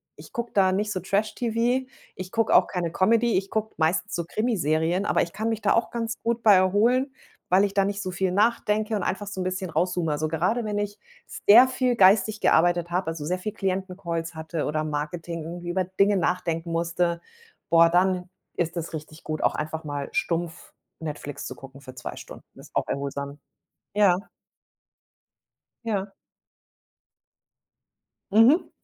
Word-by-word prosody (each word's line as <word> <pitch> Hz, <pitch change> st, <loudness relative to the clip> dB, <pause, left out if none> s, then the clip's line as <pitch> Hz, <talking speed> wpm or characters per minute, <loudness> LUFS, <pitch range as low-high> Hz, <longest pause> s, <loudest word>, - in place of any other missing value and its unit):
ich -, -, -14 dB
gucke 235 Hz, 0 st, -4 dB
da 190 Hz, -2 st, +4 dB
nicht 205 Hz, +2 st, -1 dB
so 185 Hz, -, -2 dB
Trash-TV. 230 Hz, +6 st, 0 dB, 0.3 s
Ich 185 Hz, 0 st, -7 dB
gucke 225 Hz, -1 st, +1 dB
auch -, -, +6 dB
keine 175 Hz, -3 st, -3 dB
Comedy, 225 Hz, +5 st, +3 dB
ich 195 Hz, +1 st, -2 dB
gucke 220 Hz, 0 st, -2 dB
meistens 170 Hz, +6 st, 0 dB
so 170 Hz, -, -1 dB
Krimiserien, 175 Hz, -4 st, 0 dB
aber -, -, +2 dB
ich 170 Hz, -, -7 dB
kann 220 Hz, +1 st, -2 dB
mich 225 Hz, -1 st, -2 dB
da 200 Hz, -, +3 dB
auch 230 Hz, -, +1 dB
ganz 230 Hz, -1 st, -4 dB
gut 235 Hz, 0 st, -1 dB
bei 215 Hz, -, +7 dB
erholen, 225 Hz, +9 st, +3 dB, 0.4 s
weil 185 Hz, +2 st, +5 dB
ich 200 Hz, -, -4 dB
da 200 Hz, -, +4 dB
nicht 200 Hz, +1 st, -2 dB
so 185 Hz, -, -4 dB
viel 185 Hz, +1 st, -1 dB
nachdenke 215 Hz, +1 st, +1 dB
und 205 Hz, -, -1 dB
einfach 200 Hz, +3 st, -2 dB
so 195 Hz, -2 st, -5 dB
'n -, -, -1 dB
bisschen 185 Hz, 0 st, -3 dB
raus 180 Hz, +2 st, 0 dB
zoome. 170 Hz, -3 st, -1 dB
Also, 150 Hz, +1 st, -1 dB
gerade 180 Hz, +10 st, 0 dB
wenn 210 Hz, -1 st, -2 dB
ich 205 Hz, 0 st, -3 dB, 0.5 s
sehr 235 Hz, +5 st, +9 dB
viel 255 Hz, -1 st, 0 dB
geistig 210 Hz, +1 st, +4 dB
gearbeitet 175 Hz, 0 st, +3 dB
habe, 180 Hz, +1 st, -1 dB
also, 165 Hz, -2 st, -4 dB
sehr 180 Hz, +4 st, -1 dB
viel 210 Hz, +3 st, -4 dB
Klienten-Calls 185 Hz, -4 st, -3 dB
hatte 160 Hz, 0 st, -4 dB
oder 155 Hz, +1 st, -1 dB
Marketing 155 Hz, +2 st, -4 dB
irgendwie 175 Hz, +2 st, -7 dB
über 185 Hz, +2 st, 0 dB
Dinge 195 Hz, +2 st, +2 dB
nachdenken 170 Hz, -2 st, -1 dB
musste, 170 Hz, +1 st, 0 dB, 0.5 s
boah, 165 Hz, 0 st, +6 dB
dann 180 Hz, +1 st, +1 dB, 0.3 s
ist 170 Hz, 0 st, -2 dB
es 170 Hz, 0 st, -5 dB
richtig 155 Hz, 0 st, -8 dB
gut, 155 Hz, -1 st, -4 dB
auch -, -, +2 dB
einfach 155 Hz, +1 st, -4 dB
mal 145 Hz, -2 st, -4 dB
stumpf 175 Hz, -, -2 dB, 0.3 s
Netflix 150 Hz, -3 st, -6 dB
zu -, -, -7 dB
gucken 135 Hz, +1 st, -13 dB
für 130 Hz, -2 st, -11 dB
2 125 Hz, -, -7 dB
Stunden. -, -, -11 dB, 0.2 s
Ist -, -, -15 dB
auch -, -, 0 dB
erholsam, 140 Hz, +1 st, -4 dB, 0.6 s
ja. 195 Hz, -4 st, +4 dB, 1.7 s
Ja. 200 Hz, -3 st, -2 dB, 2.2 s
Mhm. 230 Hz, -, +5 dB
185 Hz, 175 wpm, -25 LUFS, 165-210 Hz, 2.2 s, sehr